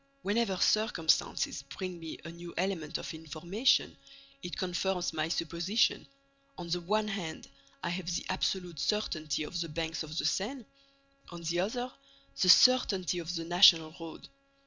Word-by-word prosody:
"Whenever 205 -1 +1
circumstances 180 -10 +1
bring 180 +5 -7
me 160 -1 -7
a 165 - -6
new 170 0 -10
element 175 -4 -1
of - - -6
information, 160 - 0 0.5
it 175 - -6
confirms 180 -1 -1
my 155 0 -1
supposition. 170 +6 0 0.5
On 175 - -7
the 175 +1 -1
one 215 +5 0
hand, 190 -6 -5 0.4
I 175 - -1
have 175 0 -4
the 175 - -2
absolute 180 -3 -2
certainty 155 -2 -1
of 170 +3 -4
the 165 - -4
banks 165 +1 -3
of 155 0 -6
the - - 0
Seine; 230 +5 -1 0.6
on 170 -1 -9
the 170 +1 -1
other, 245 +7 -2 0.5
the 185 - +4
certainty 195 -6 +5
of 170 +1 -4
the 165 0 -3
National 170 -2 +6
Road. 165 -1 -9
175 Hz, 150 wpm, -31 LUFS, 165-195 Hz, 0.6 s, National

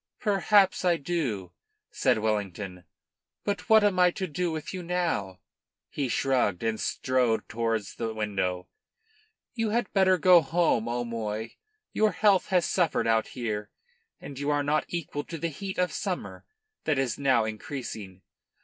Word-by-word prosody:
"Perhaps 200 -2 +3
I 175 -2 +3
do," 135 - -2 0.4
said - - +2
Wellington. 100 -4 -3 0.6
"But 200 -3 -3
what 220 -1 +7
am 200 -3 +2
I 180 0 +6
to 190 +2 -3
do 175 +1 -2
with 155 +2 -5
you 185 - -4
now?" 170 - -1 0.5
He 140 -3 -2
shrugged, 125 -9 +1
and 115 -1 -1
strode 125 -4 0
towards 115 -2 -2
the 115 -1 -3
window. 95 -4 -2 0.9
"You 225 -2 -1
had 230 0 -1
better 190 -2 +4
go 180 +1 +7
home, 155 -7 +1
O'Moy. 115 -2 -3 0.4
Your 215 -2 +2
health 200 0 +3
has 180 -3 +2
suffered 175 -4 +1
out 110 -1 +2
here, 105 -3 -3 0.5
and 140 -1 -9
you 145 +1 -1
are 145 -1 +2
not 150 +2 +1
equal 150 -4 -4
to 165 - -6
the 165 +2 -2
heat 190 +5 -6
of 180 -3 +1
summer 185 +2 -4 0.4
that 155 -3 +1
is 135 -3 -1
now 130 -5 +3
increasing. 110 - -6
140 Hz, 150 wpm, -27 LUFS, 110-180 Hz, 0.9 s, what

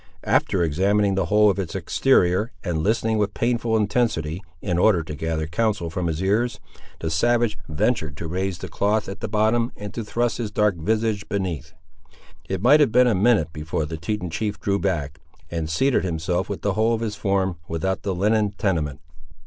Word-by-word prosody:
After 90 - +2
examining 100 +6 +2
the 95 -3 0
whole 105 +2 +5
of 100 - -4
its 95 0 -4
exterior, 95 +2 +2
and 85 -4 -1
listening 110 +3 +1
with 105 -1 -1
painful 115 -1 +1
intensity, 100 -7 0 0.2
in 90 -1 -1
order 90 -4 +4
to 75 - -7
gather 80 +1 -2
counsel 85 0 -1
from 90 +1 -2
his 80 +2 -2
ears, 110 +5 +1 0.4
the 80 - -2
savage 120 +6 +2
ventured 75 - 0
to 85 - -5
raise 95 +2 -2
the 95 - -7
cloth 105 +5 0
at 100 +2 -6
the - - -3
bottom, 110 +3 +1
and 105 -1 -7
to 115 - -4
thrust 120 +3 -1
his 115 -3 -2
dark 105 -1 +2
visage 110 +4 -1
beneath. 85 -6 -3 0.8
It 95 0 -2
might 145 +5 +7
have 145 -6 +4
been 125 +2 +5
a 120 - +3
minute 105 -4 +2
before 75 0 -3
the 80 +2 -5
Teton 90 +2 -3
chief 105 +4 -3
drew 100 0 0
back, 75 -6 -2 0.3
and 80 -2 -3
seated 130 +11 +2
himself 90 +1 -1
with 100 - -5
the 100 - +1
whole 110 +3 +2
of 110 - -5
his 110 -2 -2
form 95 -3 0
without 95 +4 -2
the 95 -2 -2
linen 105 +2 +1
tenement. 80 -7 -1
100 Hz, 190 wpm, -23 LUFS, 85-110 Hz, 0.8 s, might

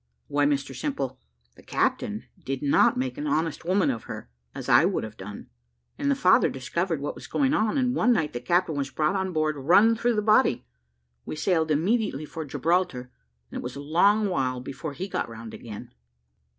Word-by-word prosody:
"Why, 145 0 +2
Mr 140 -1 -1
Simple, 135 - -3 0.4
the - - -16
captain - - -1 0.2
did 135 +1 -4
not 140 - +4
make 130 0 -2
an 150 - -3
honest 155 +2 -1
woman 185 -4 +2
of 115 -3 -6
her, - - -8 0.2
as - - -6
I - - +6
would - - 0
have 110 -1 -7
done; 100 0 -9 0.4
and 280 - -1
the 280 - +3
father 185 -9 +4
discovered 160 +5 -2
what 145 - -3
was - - -11
going 275 0 +1
on, 220 -3 +1
and 250 -2 +1
one 245 -1 +3
night 160 -10 +1
the 120 - -3
captain 170 +7 +1
was 140 -2 -2
brought 155 +7 0
on 190 -1 -1
board 155 -2 0
run 195 +11 +5
through 235 +1 +1
the 210 - 0
body. 215 - +3 0.6
We - - -6
sailed 160 0 +1
immediately 165 - +1
for 160 +1 -6
Gibraltar, 155 -4 -1 0.4
and - - -5
it - - -7
was 125 +1 -6
a - - -6
long 200 +9 +3
while 130 -8 -1
before 140 +4 -6
he 185 +7 -5
got 195 - -3
round 115 0 -9
again." 105 -3 -9
155 Hz, 200 wpm, -26 LUFS, 135-195 Hz, 0.6 s, I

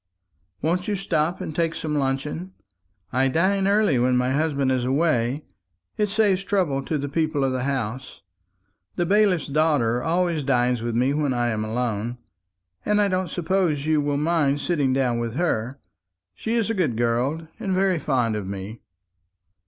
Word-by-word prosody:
"Won't 175 +4 0
you 210 - 0
stop 175 -3 -1
and 155 - -5
take 165 0 0
some 155 -1 -3
luncheon? 145 +6 -2 0.6
I 130 +2 +3
dine 190 +7 +2
early 200 - +3
when 125 +1 +3
my 125 +1 +1
husband 140 -2 +1
is 130 -1 +1
away; 135 -1 +1 0.5
it 210 -2 0
saves 200 -2 +2
trouble 180 -9 0
to 155 - -1
the 145 0 -3
people 155 -1 0
of 135 - +1
the 130 0 -2
house. 130 -3 -4 0.7
The 175 - 0
bailiff's 195 -2 +3
daughter 140 -6 +1
always 170 0 0
dines 125 -3 +1
with 115 0 -2
me 130 +4 +2
when 145 -3 0
I 120 0 +1
am 110 -2 -1
alone; 115 +1 -2 0.7
but 210 - +1
I 205 -1 +3
don't 185 -1 -1
suppose 170 -4 0
you 155 -1 +2
will 145 0 0
mind 150 -2 +1
sitting 145 -4 0
down 130 -3 +1
with 115 0 -3
her. 135 -6 -1 0.5
She 225 +1 -3
is 225 -1 +1
a - - 0
good 160 - 0
girl, 125 +7 0
and 195 - -3
very 185 -2 +2
fond 125 -7 0
of 105 -3 -4
me." 100 +3 -6
145 Hz, 170 wpm, -24 LUFS, 125-175 Hz, 0.7 s, I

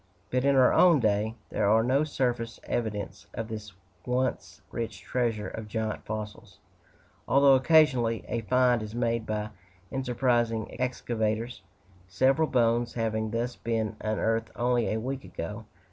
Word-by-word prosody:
But 125 0 +1
in 140 0 +4
our 130 -1 +5
own 170 -5 +6
day, 110 0 +1 0.2
there 100 - +1
are 110 +1 +4
no 130 +5 +2
surface 120 -5 -2
evidences 105 -3 -3
of 115 +1 -4
this 105 -2 -6 0.3
once 125 +3 -2
rich 110 -4 -4
treasure 115 -1 -1
of 110 -1 -7
giant 110 0 -3
fossils; 105 -2 -6 0.7
although 140 0 +6
occasionally 130 -5 +4
a 115 - -2
"find" 125 +1 +3
is 110 +1 -7
made 115 -2 0
by 105 0 -2 0.4
enterprising 120 -3 0
excavators, 115 -3 -2 0.5
several 135 - +2
bones 120 -2 +1
having 110 -1 -1
thus 120 +3 -2
been 115 -2 -2
unearthed 110 +1 0
only 120 -1 +1
a 110 - 0
week 130 +3 -4
ago. 105 +7 -6
115 Hz, 140 wpm, -28 LUFS, 110-125 Hz, 0.7 s, own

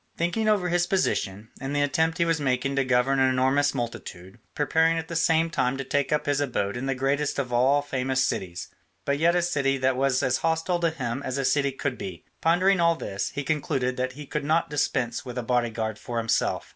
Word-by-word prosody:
Thinking 175 +6 0
over 195 -4 +2
his 175 0 +1
position, 110 - -1
and 135 +2 -3
the 145 - +2
attempt 160 +4 +1
he 170 - +2
was 165 -2 0
making 135 0 0
to 135 - +2
govern 130 +1 +2
an 130 0 +4
enormous 130 +2 +2
multitude, 95 -4 -6 0.2
preparing 160 +2 +2
at 160 0 -4
the 170 - -5
same 165 0 +2
time 125 -4 0
to 135 - -3
take 140 +2 -1
up 150 - +1
his 145 0 +1
abode 110 -7 -1
in 125 +2 -4
the 135 - 0
greatest 140 +3 0
of 125 -3 -2
all 135 +4 +3
famous 130 -1 0
cities, 90 -2 -4 0.4
but 140 0 0
yet 170 +2 +3
a 175 - +2
city 140 -5 +1
that 130 0 +1
was 130 0 +1
as 125 - +2
hostile 165 +2 0
to 170 -1 +2
him 135 -5 -4
as 130 -1 -3
a 135 - -1
city 140 +1 +2
could 135 -2 -4
be, 90 -3 -7 0.2
pondering 180 +4 +3
all 170 0 +4
this, 100 -10 -4
he 145 - -2
concluded 135 -3 -1
that 130 0 -2
he 145 +2 -9
could 150 +1 -3
not 155 +2 +1
dispense 130 -5 -1
with 125 -1 -7
a 125 - -2
bodyguard 115 -3 -1
for 120 - -5
himself. 115 -1 0
135 Hz, 220 wpm, -26 LUFS, 125-160 Hz, 0.4 s, an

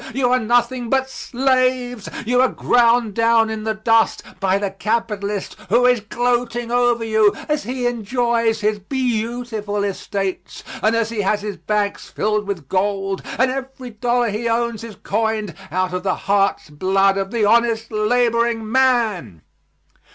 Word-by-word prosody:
You 250 -2 +2
are 255 - +4
nothing 240 +1 +1
but 265 0 +1
slaves; 255 -3 0 0.2
you 245 +2 +3
are 260 - +5
ground 235 -3 +2
down 230 0 +3
in 220 0 -5
the 220 0 -1
dust 225 +1 +2 0.2
by 190 0 +2
the 200 -1 -2
capitalist 210 -1 -2
who 240 +5 +4
is 250 -1 +4
gloating 240 +1 -1
over 245 -1 +2
you 220 -2 +3
as 300 -1 -1
he 250 0 -3
enjoys 235 -1 0
his 210 0 0
beautiful 225 -2 -2
estates 195 -1 -4 0.2
and 220 +2 +2
as 230 -1 0
he 220 -3 -1
has 205 +1 0
his 210 -2 -5
banks 210 -1 -2
filled 210 -1 -1
with 175 -9 -4
gold, 195 +1 -1 0.2
and 255 +1 +3
every 265 -1 -6
dollar 240 +2 0
he 220 +3 -2
owns 230 -1 -1
is 225 -3 -8
coined 215 -3 -1 0.2
out 185 0 -1
of 180 - -2
the 185 0 0
hearts' 195 -5 +1
blood 195 +5 +2
of 195 0 -2
the 225 -1 0
honest 230 +1 +2
laboring 230 0 +1
man." 225 - +1
225 Hz, 155 wpm, -20 LUFS, 205-245 Hz, 0.2 s, are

